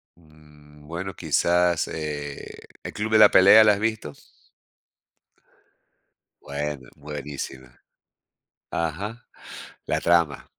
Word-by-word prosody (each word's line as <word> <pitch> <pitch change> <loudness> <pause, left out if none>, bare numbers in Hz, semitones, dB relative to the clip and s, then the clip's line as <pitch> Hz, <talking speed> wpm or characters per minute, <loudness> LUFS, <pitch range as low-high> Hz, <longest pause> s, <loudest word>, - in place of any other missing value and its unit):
Mmm, 75 -2 -20
bueno, 90 +4 -5
quizás, 85 0 +1
eh, 75 -2 -7 0.2
¿"El - - -7
club 110 +1 -4
de 110 - +5
la 105 -1 +8
pelea", 100 +4 +8
la 105 -1 +5
has 100 - -3
visto? 110 -9 -3 2.3
Bueno, 70 -2 -5
buenísima. 70 -3 -8 0.9
Ajá. 100 +9 -4 0.6
La - - -1
trama 85 -4 +1
80 Hz, 95 wpm, -24 LUFS, 75-95 Hz, 2.3 s, la